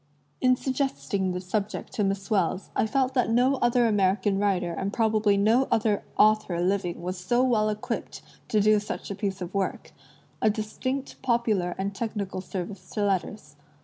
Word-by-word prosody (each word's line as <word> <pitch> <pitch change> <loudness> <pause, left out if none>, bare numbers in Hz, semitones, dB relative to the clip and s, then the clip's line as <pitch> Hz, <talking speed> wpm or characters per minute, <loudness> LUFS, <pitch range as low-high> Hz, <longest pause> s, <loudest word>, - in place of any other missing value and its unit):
In 255 0 +5
suggesting 250 -8 -1
the 180 - -3
subject 200 +3 -3
to 210 - 0
Miss 195 +1 -2
Wells, 190 -2 0
I - - +2
felt 265 +2 +1
that 250 -4 +2
no 250 +4 +3
other 240 0 +3
American 195 -2 +2
writer 185 -4 +1
and 195 +4 -3
probably 215 -2 +2
no 225 +6 +3
other 215 -2 +2 0.2
author 215 -5 +3
living 180 -1 -1
was 180 +1 -4
so 240 +8 +1
well 220 -4 +2
equipped 210 0 -4 0.2
to 215 - +2
do 210 +1 +4
such 205 - -6
a - - -3
piece 195 -2 -3
of 175 0 -5
work 195 -1 -2 0.3
— - - -33
a 215 - +4
distinct 255 +6 -3
popular 225 -8 +1
and 195 +1 -2
technical 200 -2 -3
service 185 0 -6
to 210 - -2
letters. 185 -5 -2
205 Hz, 175 wpm, -26 LUFS, 190-230 Hz, 0.3 s, In